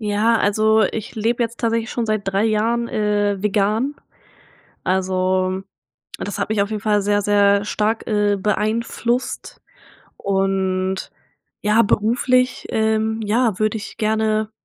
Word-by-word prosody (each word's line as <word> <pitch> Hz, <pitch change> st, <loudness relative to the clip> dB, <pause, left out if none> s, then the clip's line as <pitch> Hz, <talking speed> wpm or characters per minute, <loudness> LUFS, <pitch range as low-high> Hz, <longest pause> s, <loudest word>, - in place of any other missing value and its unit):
Ja, 215 Hz, +2 st, +2 dB
also 215 Hz, +2 st, +3 dB
ich 215 Hz, +3 st, -3 dB
lebe 230 Hz, +2 st, 0 dB
jetzt 230 Hz, 0 st, -4 dB
tatsächlich 230 Hz, 0 st, 0 dB
schon 235 Hz, -2 st, -2 dB
seit 215 Hz, -1 st, 0 dB
3 195 Hz, +2 st, +1 dB
Jahren, 225 Hz, +2 st, +1 dB
äh, 205 Hz, -2 st, 0 dB
vegan. 210 Hz, +6 st, +1 dB, 0.9 s
Also, 185 Hz, 0 st, 0 dB, 0.6 s
das 205 Hz, -, -5 dB
hat -, -, -2 dB
mich 215 Hz, -2 st, +1 dB
auf 200 Hz, -, -1 dB
jeden 215 Hz, -2 st, -4 dB
Fall 210 Hz, -1 st, +2 dB
sehr, 205 Hz, +1 st, +1 dB
sehr 200 Hz, 0 st, +3 dB
stark, 215 Hz, +2 st, -1 dB
äh, 205 Hz, -2 st, +1 dB
beeinflusst 230 Hz, +4 st, -2 dB, 0.6 s
und, 190 Hz, -1 st, -1 dB, 0.5 s
ja, 210 Hz, +2 st, +4 dB
beruflich, 250 Hz, +4 st, +1 dB
ähm, 220 Hz, 0 st, 0 dB
ja, 220 Hz, -1 st, +1 dB
würde 215 Hz, +1 st, +1 dB
ich 215 Hz, -, -8 dB
gerne 215 Hz, 0 st, 0 dB
215 Hz, 130 wpm, -20 LUFS, 200-225 Hz, 0.9 s, ja